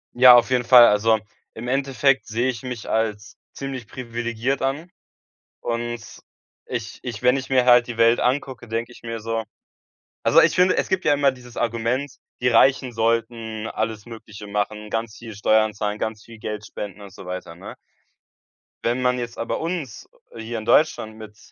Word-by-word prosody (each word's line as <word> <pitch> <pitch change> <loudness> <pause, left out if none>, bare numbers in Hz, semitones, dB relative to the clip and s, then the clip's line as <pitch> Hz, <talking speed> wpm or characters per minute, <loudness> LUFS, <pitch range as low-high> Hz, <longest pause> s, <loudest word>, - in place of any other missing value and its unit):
Ja, 125 0 +9
auf 120 - +4
jeden 125 -1 +2
Fall. 120 0 +8
Also, 110 +1 +3 0.3
im 115 +2 -7
Endeffekt 135 0 +1
sehe 120 +4 -1
ich 125 0 -5
mich 125 -4 -6
als 110 -1 -2 0.2
ziemlich 135 -4 -6
privilegiert 120 +1 -3
an. 140 +6 -2 0.7
Und 120 -1 -3 0.6
ich 120 -2 -5
ich 120 -5 -6
wenn 125 +2 +4
ich 130 - -6
mir 130 -2 +3
halt 120 -1 +6
die 120 -1 -6
Welt 115 +1 +4
angucke, 130 -1 -1
denke 115 +2 -3
ich 120 - -16
mir 115 -1 -5
so 115 0 -2 0.8
also - - +6
ich - - +4
finde, 180 +1 +4
es - - +1
gibt 190 0 0
ja 145 - +5
immer 140 -1 +3
dieses 125 -2 -14
Argument: 120 +4 -1 0.3
Die 125 - +2
Reichen 130 +2 +4
sollten 115 -1 -1
alles 110 -1 -3
Mögliche 105 -2 -10
machen, 105 +1 -3
ganz 115 -1 -3
viel 115 -2 -9
Steuern 110 +1 +2
zahlen, 105 0 -3
ganz 110 -1 -4
viel 115 -1 -13
Geld 105 0 -5
spenden 105 0 -7
und 100 -2 -11
so 95 - -12
weiter, 90 -2 -6
ne? - - -10 1.1
Wenn 120 +2 0
man 125 0 +1
jetzt 120 -1 -6
aber 115 - -3
uns, 165 -8 -5 0.2
äh, 115 - -11
hier 115 +1 -5
in 110 - -5
Deutschland 115 -4 +2
mit 105 -1 -11
115 Hz, 180 wpm, -23 LUFS, 110-125 Hz, 1.1 s, Ja